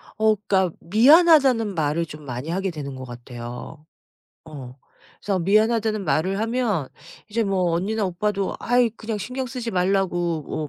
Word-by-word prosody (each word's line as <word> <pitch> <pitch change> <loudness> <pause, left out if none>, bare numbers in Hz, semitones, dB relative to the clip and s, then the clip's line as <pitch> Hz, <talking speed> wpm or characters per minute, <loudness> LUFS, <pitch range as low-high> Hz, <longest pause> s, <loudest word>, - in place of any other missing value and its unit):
어 220 0 +3
그러니까 190 -3 0
"미안하다."는 255 - +5
말을 160 +1 0
좀 150 -1 -11
많이 125 +4 -6
하게 190 +1 -1
되는 140 -4 -6
것 130 0 -8
같아요. 120 +4 -9 0.6
어. 135 -5 -10 0.5
그래서 195 -2 -1
"미안하다."는 215 +2 +2
말을 190 +6 0
하면 225 - -1 0.4
이제 225 +2 0
뭐 185 -4 0
언니나 205 +5 -1
오빠도 195 +2 -2
"아이 245 0 +3
그냥 220 -1 -5
신경 255 +5 -4
쓰지 240 -2 -5
말라."고 175 -5 -1
195 Hz, 315 characters per minute, -23 LUFS, 155-220 Hz, 0.6 s, 미안하다."는